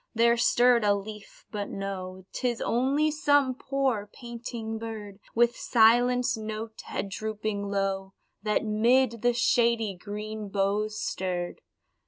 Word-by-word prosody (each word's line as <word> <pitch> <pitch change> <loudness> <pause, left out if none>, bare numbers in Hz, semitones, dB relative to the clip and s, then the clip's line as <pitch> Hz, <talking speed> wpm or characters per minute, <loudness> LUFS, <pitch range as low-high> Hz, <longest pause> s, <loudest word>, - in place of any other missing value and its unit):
there 235 +1 +5
stirred 240 0 +4
a 205 -1 +4
leaf, 210 +1 -9
but 205 -1 -4
no, 190 -1 -5
Tis 240 -2 -1
only 275 +6 +1
some 285 -3 +3
poor, 260 -6 -1
panting 235 -2 -6
bird, 215 -3 -7 0.2
With 240 +1 +4
silenced 245 +1 +3
note, 220 +1 -6
head - - -3
drooping 215 0 -3
low, 195 -1 -1 0.3
That 210 +1 0
'mid 230 +2 +3
the 245 0 +3
shady 235 -3 +2
green 210 +2 -6
boughs 205 +2 0
stirred. 180 -2 -3
220 Hz, 125 wpm, -28 LUFS, 205-240 Hz, 0.3 s, there